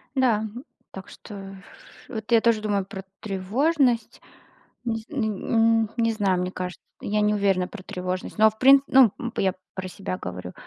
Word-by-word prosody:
Да, 235 -5 +2 0.5
так 190 0 -9
что, 195 -2 -10 0.5
вот, 220 -1 -7
я 230 - +6
тоже 230 -2 +2
думаю 200 -3 0
про 195 0 -8 0.2
тревожность. 235 - 0 0.6
Низ 225 -2 -2
н 270 -7 -1 0.6
м, 210 - -8
не 230 -1 +2
знаю, 195 -4 +1
мне 180 0 -2
кажется, 180 -1 -6 0.2
я 210 +1 -1
не 210 0 +2
уверена 195 -3 +1
про 215 - -10
тревожность, 185 +2 -4
но 220 0 +6
в 215 - -22
прин 270 +2 +7
ну, 260 -6 +6
м, 240 - -4
я 190 -1 +1 0.2
про 190 -1 -5
себя 185 0 -5
говорю. 90 0 -7
210 Hz, 170 wpm, -25 LUFS, 190-230 Hz, 0.6 s, прин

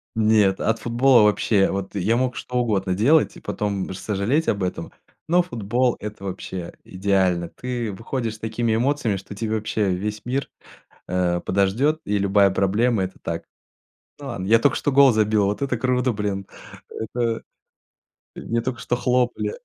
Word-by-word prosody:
Нет, 105 -3 +3
от 110 - 0
футбола 120 0 +4
вообще 105 -1 +3
Вот 95 +1 -4
я 105 +4 +1
мог 125 0 0
что 125 - -7
угодно 100 -6 0
делать 135 - +3
и - - -11
потом 100 -3 -3
сожалеть 105 - -1
об 100 - 0
этом, 90 -2 -4 0.4
но 175 +2 +5
футбол- 120 - 0
это 105 -1 -7
вообще 95 -2 -6
идеально. 95 -2 0
Ты 120 +1 -4
выходишь 115 +2 -4
с - - -15
такими 110 +1 -1
эмоциями, 125 -2 +1
что 95 +1 -8
тебе 110 +1 -2
вообще 110 -1 -1
весь 105 +4 -4
мир, 130 +3 -2 0.6
э, 90 -1 0
подождет, 110 +12 +1
и 105 0 0
любая 100 0 +4
проблема- 105 +3 +1
это 95 - -6
так. - - -4 0.7
Ну, 145 - -8
ладно, 100 -7 -4
я 115 +2 +5
только 145 - +2
что 145 - 0
гол 135 -2 +6
забил, 110 -1 +2
вот 100 +5 -2
это 130 -3 -1
круто, 125 +1 +1
блин! 100 -2 -3 0.4
Это 115 0 -3 0.9
мне 115 0 -2
только 120 -1 -4
что 120 - -1
хлопали. 125 - 0
110 Hz, 160 wpm, -23 LUFS, 100-125 Hz, 0.9 s, гол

